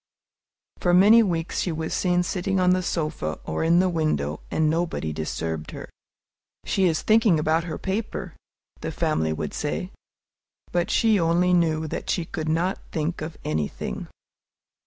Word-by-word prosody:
For 175 -1 +3
many 210 +5 +7
weeks 170 -5 -1
she 180 - 0
was 160 0 -3
seen 180 -1 +2
sitting 190 +2 -1
on 180 0 +4
the 185 0 +2
sofa 155 - -2
or 80 - -2
in 165 +1 +4
the 185 +1 +4
window, 155 - -1
and 160 - +1
nobody 160 - -1
disturbed 80 0 -3
her. - - -9 0.7
"She 195 - +2
is 165 -3 +1
thinking 220 -5 +4
about 160 +2 +1
her 160 -3 -4
paper," 200 +3 -4 0.4
the - - -4
family 80 0 0
would 80 - -3
say, - - -3 0.8
but 175 -1 0
she 220 -3 +3
only 175 +2 +3
knew 160 -2 +2
that - - -5
she 175 - 0
could 160 -1 -4
not 175 +4 0
think 160 +2 -2
of 155 +1 -6
anything. 75 -1 -3
165 Hz, 155 wpm, -25 LUFS, 155-180 Hz, 0.8 s, many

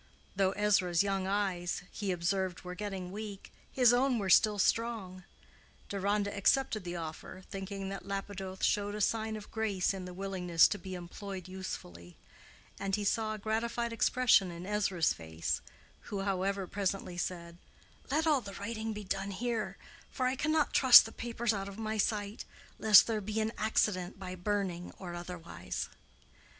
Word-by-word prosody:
Though 190 0 +2
Ezra's 195 -4 +3
young 195 -1 -1
eyes 190 -3 -1
he 200 -3 -2
observed 180 +1 -1
were 180 0 -6
getting 190 -2 -5
weak, 205 -1 -7 0.2
his 245 -2 +5
own 255 0 +3
were 195 -4 0
still 210 +2 +6
strong. 200 -4 0 0.6
Deronda 200 +1 0
accepted 215 +1 +2
the 175 0 -5
offer, 165 +3 -7
thinking 195 0 -5
that 195 0 -7
Lapidoth 195 -1 -5
showed 205 0 +1
a - - -4
sign 220 +1 0
of 210 -1 -9
grace 205 -4 0
in 190 -2 -6
the 180 - -7
willingness 180 -3 +3
to 205 - -2
be 190 -1 -6
employed 185 +1 -7
usefully; 90 - -7 0.6
and 195 -1 0
he 210 - -3
saw 215 +1 0
a - - -7
gratified 230 +2 -1
expression 230 -4 +4
in 170 +1 -7
Ezra's 195 -5 +1
face, 80 0 -3 0.5
who, 200 -2 -2
however, 195 0 -1
presently 195 -1 -2
said, 170 -1 -4 0.5
"Let 310 +3 +1
all 300 -4 +3
the 200 -3 -8
writing 220 +1 -4
be 210 0 -6
done 195 +1 -2
here; 210 -1 -2 0.3
for 255 - -2
I 255 +1 +1
cannot 310 +2 +1
trust 260 -2 +10
the 225 - -7
papers 235 -1 -1
out 195 -1 -3
of 195 - -10
my 220 -1 -3
sight, 205 0 -1 0.4
lest 215 -2 +8
there 220 -2 -1
be 215 +2 -2
an 220 0 0
accident 195 -4 0
by 185 -1 -6
burning 185 -2 -2
or 180 -2 -7
otherwise." 175 - -6
195 Hz, 160 wpm, -32 LUFS, 185-215 Hz, 0.6 s, trust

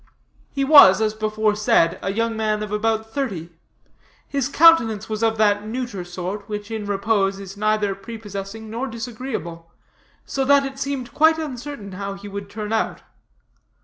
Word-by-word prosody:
He 275 - -2
was, 270 -11 +8
as 215 -1 +1
before 215 0 0
said, 210 -5 +2
a 195 - -2
young 230 +2 -1
man 215 -1 -1
of 210 - -6
about 220 +1 -1
thirty. 195 - -3 0.8
His 275 -2 -1
countenance 265 -10 +5
of 225 -1 +1
that 205 -1 +2
neuter 235 -5 -4
sort, 185 +4 -6
which, 210 +1 -5
in 215 -2 -4
repose, 200 -1 0
is 195 0 -9
neither 215 -1 +1
prepossessing 205 0 -8
nor 235 +5 -4
disagreeable; 225 -8 -6 0.5
so 270 - -2
that 280 +1 +4
it 270 0 -7
seemed 275 -3 -4
quite 320 +1 +4
uncertain 270 -7 -6
how 200 +1 -5
he 200 +1 -10
would 200 0 -7
turn 210 +1 -5
out. 225 - -1
215 Hz, 155 wpm, -22 LUFS, 200-240 Hz, 0.8 s, was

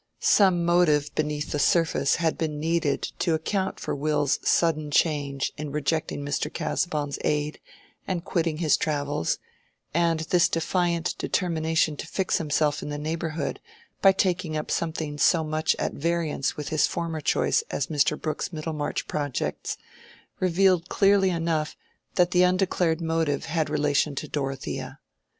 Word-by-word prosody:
Some 185 -4 +4
motive 155 -4 +3
beneath 150 -1 -2
the 150 - -1
surface 165 -2 +3
had 165 -2 0
been 150 -2 -3
needed 165 -2 0 0.2
to 170 -3 +2
account 190 +4 -2
for - - -3
Will's 145 0 +1
sudden 155 -3 +2
change 145 -3 +1
of - - -29
course - - -6
in 150 - -5
rejecting 150 0 -1
Mr. 145 +1 -2
Casaubon's 150 -6 -2
aid 150 0 -1 0.5
and 180 -2 -2
quitting 165 -3 0
his 160 -2 +3
travels; 145 - -1 0.6
and 165 -1 +2
this 175 +2 +3
defiant 170 0 0
determination 160 -3 0
to - - -6
fix 190 +2 0
himself 150 -1 +1
in - - -5
the 145 - -3
neighborhood 160 0 -3 0.4
by 195 - +8
taking 180 -4 0
up 150 - -4
something 155 -3 -2
so 165 +1 +4
much 155 0 0
at - - -2
variance 165 -3 -1
with 150 - -4
his 155 - +3
former 165 -2 -3
choice 445 - +2
as - - -1
Mr. 150 -1 +1
Brooke's 155 +2 -3
Middlemarch 155 -2 -3
projects, 145 -4 -3 0.6
revealed 185 -1 +3
clearly 195 -1 +4
enough 165 -3 -1 0.4
that 180 -1 +3
the 180 - +4
undeclared 180 -2 +2
motive 160 -3 0
had 160 -2 -1
relation 150 -1 +1
to - - -4
Dorothea. 135 -2 -4
160 Hz, 150 wpm, -26 LUFS, 150-170 Hz, 0.6 s, by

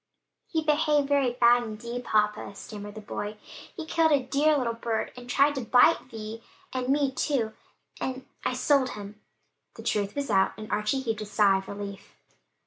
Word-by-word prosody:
"He 320 -2 -1
behaved 300 -2 +2
very 280 -3 +3
bad 240 0 +5
indeed, 235 +2 -6
papa," 210 -2 +1
stammered 205 0 -8
the 215 - -7
boy; 210 0 -5 0.4
"he 330 - -5
killed 320 0 +2
a 290 - +5
dear 290 +4 +3
little 240 -4 0
bird 230 -1 -2
and 245 0 -11
tried 280 +3 +4
to 270 - -3
bite 250 +7 +5
Vi, 225 -1 -7 0.3
and 255 0 -2
me 280 -1 +2
too 255 -5 -1 0.5
and 260 0 -4 0.2
I - - 0
sold 275 -3 +3
him." 205 +1 -9 0.5
The - - -10
truth 205 -1 -1
was 285 -1 -2
out 190 0 +3
and 215 0 -8
Archie 210 +6 0
heaved 225 -4 -2
a - - -4
sigh 200 -2 +4
of 190 - -11
relief. 200 -1 -8
240 Hz, 180 wpm, -27 LUFS, 210-275 Hz, 0.5 s, bad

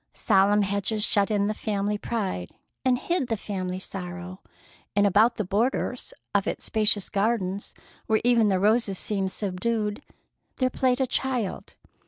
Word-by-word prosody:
Solemn 205 +2 +4
hedges 200 +2 -1
shut 200 -2 +2
in 205 -2 +1
the 210 - 0
family 210 -1 -1
pride 200 - -3 0.3
and 255 -1 +3
hid 340 0 -1
the 225 -2 -1
family 185 -3 -4
sorrow, 180 -1 -7 0.5
and 205 0 +4
about 215 +4 +4
the 215 - -1
borders 235 +5 -1 0.2
of 200 -1 +2
its - - -2
spacious 210 -2 +2
gardens, 200 -2 -1 0.3
where 220 -1 +3
even 235 -3 +4
the 190 - +2
roses 210 -1 +2
seemed 195 -2 -1
subdued, 210 +3 -2 0.6
there 255 -1 +1
played 255 0 +1
a 265 - +3
child. 250 -5 -2
210 Hz, 150 wpm, -26 LUFS, 195-230 Hz, 0.6 s, Solemn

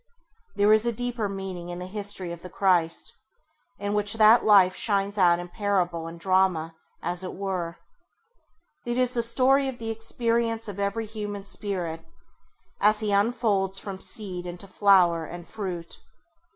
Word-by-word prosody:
There 205 +1 +4
is 220 +2 +3
a - - +2
deeper 235 -2 -3
meaning 190 -3 -6
in 175 - -5
the 180 - -6
history 200 -2 -1
of 170 -1 -8
the 180 - -9
Christ, 180 -3 +1 0.6
in 205 0 -3
which 210 +1 +1
that 220 +1 +6
life 190 -3 +5
shines 200 -1 0
out 175 -2 +5
in 175 0 -6
parable 180 -4 -1
and 165 +1 -9
drama, 185 -3 +1 0.3
as 175 +2 -3
it 185 - -6
were. 180 -3 -3 1.1
It 240 0 -3
is 250 -1 +1
the 240 - +1
story 265 +4 +3
of 260 -2 -5
the 225 -1 -4
experience 230 0 -1
of 200 -1 -7
every 200 +3 -1
human 205 -2 -6
Spirit, 185 -5 -4 0.8
as 210 +1 +3
he 210 -1 -1
unfolds 200 -2 +1
from 195 -1 -6
seed 185 -4 -3
into 175 +2 -8
flower 185 -4 +4
and 175 +2 -9
fruit. 180 -6 -6
200 Hz, 160 wpm, -26 LUFS, 180-220 Hz, 1.1 s, that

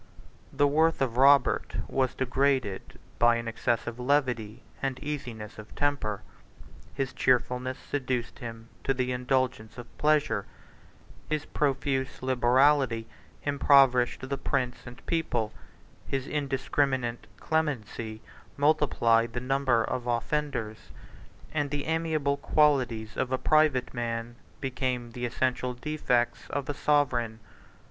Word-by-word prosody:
The 145 - +2
worth 160 +3 +3
of 125 -4 0
Robert 135 0 +4
was 130 -2 0
degraded 130 -5 0 0.2
by 120 0 +5
an 115 0 -3
excessive 115 +1 -1
levity 125 -4 0 0.2
and 135 -2 -1
easiness 120 -9 -6
of 105 - -11
temper: 110 -9 -1 0.7
his 135 -2 -2
cheerfulness 125 0 +1
seduced 130 -4 -3
him 115 -1 -8
to 135 - +1
the 125 0 -1
indulgence 125 -3 -1
of 120 -1 -11
pleasure; 150 -8 +2 0.8
his 155 0 -1
profuse 135 -1 -1
liberality 130 -1 +3 0.4
impoverished 135 -3 +4
the 140 0 -3
prince 130 -4 -2
and 120 0 -11
people; 160 -10 -1 0.5
his 135 -1 -2
indiscriminate 135 -4 -1
clemency 120 -8 -2 0.3
multiplied 120 -6 +3
the 125 - -2
number 130 -2 +2
of 125 +1 -3
offenders; 120 -2 -2 0.6
and 145 -2 0
the 145 0 -3
amiable 155 -3 0
qualities 125 -9 +2
of 130 - -1
a 130 - +2
private 155 -3 +2
man 120 -1 -3 0.3
became 130 -3 -2
the 120 +1 -3
essential 125 0 -1
defects 125 -3 -1
of 140 -2 -3
a 145 - -1
sovereign. 125 -7 +1
130 Hz, 115 wpm, -28 LUFS, 120-140 Hz, 0.8 s, by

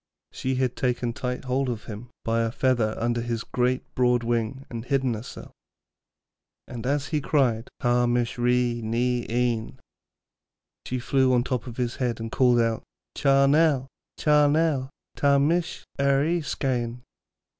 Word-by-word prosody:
She 130 0 -2
had 130 -1 0
taken 125 -2 -1
tight 125 +1 -4
hold 130 +1 0
of 115 -3 -4
him 110 +2 -8 0.2
by 115 0 +1
a 115 0 0
feather 120 -4 +1
under 120 +1 0
his 115 -1 -3
great, 125 +1 0
broad 125 -1 +2
wing 120 +3 -1
and 115 -2 -6
hidden 130 -1 0
herself. 110 +2 -8 1.2
And 120 0 -6
as 140 +1 0
he 150 -2 0
cried 125 -6 +1
'Ta 120 0 +3
mish 120 0 0
Ree 120 -1 +1
ny 120 +2 0
Ein,' 120 -1 -1 1.1
she 125 - -2
flew 130 +1 +2
on 120 - +2
top 125 -1 -3
of 120 - -8
his 120 -2 -2
head 120 -3 -1
and 115 0 -5
called 125 -2 +4
out, 115 -1 +1 0.3
'Cha 140 -1 +4
nel, 145 -2 +3 0.3
cha 150 -1 +4
nel, 145 -3 +1 0.3
ta 140 -1 +3
mish 170 +5 0 0.2
er 140 0 +3
y 170 +2 +1
skyn.' 125 -5 -2
125 Hz, 155 wpm, -25 LUFS, 120-135 Hz, 1.2 s, called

